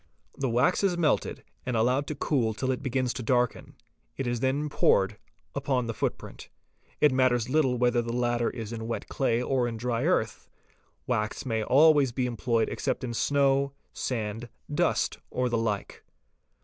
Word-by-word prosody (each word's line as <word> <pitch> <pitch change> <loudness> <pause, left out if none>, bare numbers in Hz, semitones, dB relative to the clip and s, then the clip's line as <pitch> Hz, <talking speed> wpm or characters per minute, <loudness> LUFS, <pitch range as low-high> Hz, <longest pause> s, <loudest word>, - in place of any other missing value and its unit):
The 135 -2 -1
wax 125 - +2
is 185 -3 +2
melted 160 -3 0 0.2
and 125 -2 -1
allowed 125 +5 +2
to 150 - -3
cool 120 -6 0
till 130 +3 -1
it 130 - -3
begins 130 -2 -1
to 125 - -5
darken, 125 +1 0 0.4
it 135 - -2
is 120 -1 -1
then 135 +4 0
poured 100 -7 +2 0.3
upon 135 -3 0
the 115 - -3
foot - - -1
print. - - -11 0.5
It 150 - +5
matters 130 -2 +2
little 135 -4 +2
whether 120 0 +2
the 115 0 -4
latter 120 -1 +1
is 115 -1 -6
in 115 -1 -5
wet 115 - -4
clay 120 -3 0
or 125 -2 +1
in 115 -1 -4
dry 120 +2 -1
earth; 165 -11 0 0.6
wax 110 -2 -2
may 115 -3 -1
always 140 +2 +5
be 125 +1 -1
employed 115 -1 0
except - - -2
in 120 -2 -3
snow, 140 +2 +2 0.2
sand, 115 -1 -3 0.2
dust, - - +1
or 125 0 -1
the 120 - 0
like. 105 -3 -3
125 Hz, 175 wpm, -28 LUFS, 115-135 Hz, 0.6 s, It